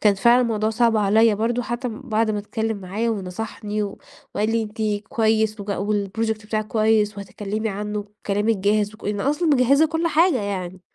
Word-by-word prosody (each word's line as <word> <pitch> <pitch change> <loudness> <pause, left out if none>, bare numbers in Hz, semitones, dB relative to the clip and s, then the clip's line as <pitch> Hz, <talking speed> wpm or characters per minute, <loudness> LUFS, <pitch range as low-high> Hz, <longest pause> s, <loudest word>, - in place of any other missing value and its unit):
كان 210 -2 +4
فعلًا 235 +5 +5
الموضوع 220 -2 0
صعب 230 0 +2
عليّا 215 +2 +4
برضه 230 +4 0
حتى 240 +2 -3
بعد 225 -2 -1
ما 210 - -1
اتكلّم 220 +1 -3
معايا 200 +5 -2
ونصحني 210 +1 -4
و 200 -1 -5 0.4
وقال 215 +1 0
لي: 230 0 +1
"أنتِ 210 -1 -3
كويس 220 -1 +1
و - - -6
والproject 210 +2 -2
بتاعِك 215 0 -2
كويس، 215 -1 +2
وهتتكلّمي 210 +2 -4
عنه 210 +1 -3
وكلامِك 210 +1 -1
جاهز، 205 +2 +1
وك - - -16
لأن 205 -1 -2
أصلًا 295 - +1
مجهِّزة 280 +2 +4
كل 325 +2 -1
حاجة 325 - +3
يعني." 185 -2 -4
215 Hz, 175 wpm, -22 LUFS, 205-230 Hz, 0.4 s, فعلًا